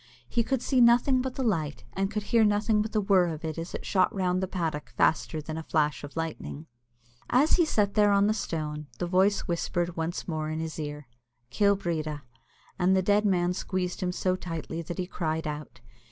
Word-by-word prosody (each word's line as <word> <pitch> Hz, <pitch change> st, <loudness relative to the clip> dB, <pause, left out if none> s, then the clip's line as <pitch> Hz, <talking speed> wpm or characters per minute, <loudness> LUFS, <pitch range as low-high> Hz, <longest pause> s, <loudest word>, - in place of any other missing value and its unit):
He 235 Hz, -, +1 dB
could 260 Hz, 0 st, -1 dB
see 260 Hz, -3 st, +3 dB
nothing 245 Hz, +2 st, +5 dB
but 260 Hz, 0 st, -4 dB
the 265 Hz, -, -2 dB
light, 160 Hz, -, -1 dB
and 195 Hz, 0 st, 0 dB
he -, -, -11 dB
could 210 Hz, -1 st, -2 dB
hear 230 Hz, +2 st, +3 dB
nothing 210 Hz, +1 st, +2 dB
but 215 Hz, +1 st, -3 dB
the 215 Hz, -, +1 dB
whirr 195 Hz, -3 st, +4 dB
of 160 Hz, -1 st, -5 dB
it 160 Hz, 0 st, -4 dB
as 165 Hz, +1 st, -5 dB
it -, -, -6 dB
shot 185 Hz, -2 st, +2 dB
round 185 Hz, -1 st, +1 dB
the 190 Hz, -, -1 dB
paddock 165 Hz, -5 st, -3 dB
faster 155 Hz, -1 st, +1 dB
than 155 Hz, +2 st, -5 dB
a -, -, -6 dB
flash 150 Hz, -2 st, 0 dB
of 145 Hz, +2 st, -9 dB
lightning. 160 Hz, -1 st, -4 dB, 0.6 s
As 275 Hz, +5 st, +4 dB
he 345 Hz, -, +4 dB
sat 205 Hz, -9 st, +1 dB
there 210 Hz, -1 st, +4 dB
on 200 Hz, 0 st, +4 dB
the 215 Hz, -, +3 dB
stone, 150 Hz, -7 st, -4 dB
the 175 Hz, -, -2 dB
voice 190 Hz, +3 st, +3 dB
whispered 175 Hz, 0 st, -2 dB
once 165 Hz, +1 st, -3 dB
more 155 Hz, -2 st, -2 dB
in 155 Hz, 0 st, -3 dB
his 160 Hz, 0 st, -4 dB
ear, 150 Hz, -1 st, -5 dB, 0.5 s
"Kill 200 Hz, +6 st, +3 dB
Breedya;" 155 Hz, -6 st, -3 dB, 0.6 s
and 185 Hz, +1 st, +4 dB
the 190 Hz, -, +2 dB
dead 205 Hz, +2 st, +3 dB
man 180 Hz, -2 st, +2 dB
squeezed 180 Hz, 0 st, -3 dB
him 180 Hz, -1 st, 0 dB
so 185 Hz, 0 st, 0 dB
tightly 165 Hz, -2 st, -5 dB
that 170 Hz, +1 st, -6 dB
he 185 Hz, -, -1 dB
cried 160 Hz, -3 st, -2 dB
out. 150 Hz, 0 st, -6 dB
180 Hz, 215 wpm, -28 LUFS, 160-205 Hz, 0.6 s, nothing